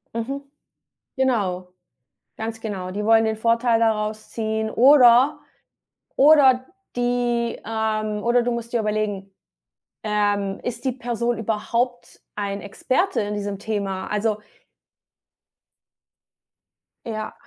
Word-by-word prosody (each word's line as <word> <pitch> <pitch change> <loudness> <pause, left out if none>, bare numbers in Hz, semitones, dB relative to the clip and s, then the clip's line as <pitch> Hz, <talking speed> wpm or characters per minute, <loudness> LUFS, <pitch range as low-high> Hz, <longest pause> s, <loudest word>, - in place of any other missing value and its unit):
Mhm, 265 +5 -3 0.7
genau. 190 -9 -1 0.6
Ganz 225 0 -5
genau. 195 -5 -5
Die 210 +2 -3
wollen 225 0 +5
den 220 0 0
Vorteil 230 +1 +2
daraus 215 -1 -1
ziehen 220 -1 -2
oder 255 +1 +6 0.8
oder 270 -3 +6 0.3
die, 245 -1 0
ähm 215 -1 -2
oder 240 0 +3
du 245 - -1
musst 235 0 -5
dir 235 - +2
überlegen, 210 -2 -2 0.7
ähm, 205 -2 0
ist 240 0 -5
die 260 - +1
Person 240 -1 -2
überhaupt 235 +3 -2
ein 200 -1 -3
Experte 260 - -1
in 210 0 -2
diesem 205 -1 -4
Thema? 200 -2 -3
Also 210 0 0 2.7
Ja. 215 -2 -5
225 Hz, 105 wpm, -22 LUFS, 210-240 Hz, 2.7 s, oder